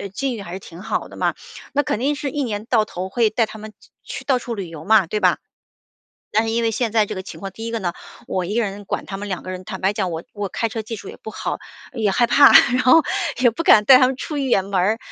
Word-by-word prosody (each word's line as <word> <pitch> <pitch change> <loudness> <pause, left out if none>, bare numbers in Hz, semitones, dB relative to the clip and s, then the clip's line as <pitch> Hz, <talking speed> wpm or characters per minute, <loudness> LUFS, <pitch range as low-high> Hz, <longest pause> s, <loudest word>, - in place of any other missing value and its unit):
境 275 -1 -1
遇 215 - -7
还 175 -3 -8
是 190 - -5
挺 175 -2 -12
好 215 - -2
的 - - -13
嘛， - - 0 0.4
那 290 - +2
肯 255 - -2
定 285 +4 0
是 285 -1 -4
一 290 - -2
年 215 -3 -4
到 230 -2 +3
头 185 -2 -6
会 230 +2 +2
带 225 +2 +1
他 220 0 -11
们 215 0 -10 0.3
去 - - -7
到 260 -3 +2
处 240 -1 -5
旅 195 -5 -5
游 160 -1 -10
嘛， 215 -1 +5
对 210 +6 -2
吧？ - - +3 1.0
但 220 +2 +3
是 225 - -2
因 230 +1 0
为 225 - +2
现 225 0 -1
在 220 -2 +3
这 - - -5
个 185 - -5
情 190 - -10
况， 195 - -5
第 225 +4 -7
一 - - -3
个 230 - -2
呢， 175 -4 -3 0.3
我 185 - -2
1 195 +4 -4
个 - - +3
人 205 -1 -5
管 - - -4
他 195 - -5
们 205 +1 -6
2 190 -3 -4
个 185 - -7
人， 185 0 -7
坦 190 -1 -7
白 195 +2 +1
讲 190 -3 -1
我 165 0 -4
我 205 -1 -3
开 230 - -1
车 220 0 -4
技 225 +2 -6
术 200 - -10
也 - - -9
不 220 - -9
好， - - -4 0.4
也 220 -4 +1
害 240 +5 +3
怕， 280 +3 +7 0.2
然 255 - +2
后 315 +6 +6 0.4
也 245 -2 +5
不 235 - -4
敢 210 -9 +6
带 265 - +9
他 255 - +5
们 260 0 -2
出 300 +3 -5
远 255 -9 +1
门 200 - -7
儿。 205 +5 +2
215 Hz, 305 characters per minute, -21 LUFS, 195-240 Hz, 1.0 s, 带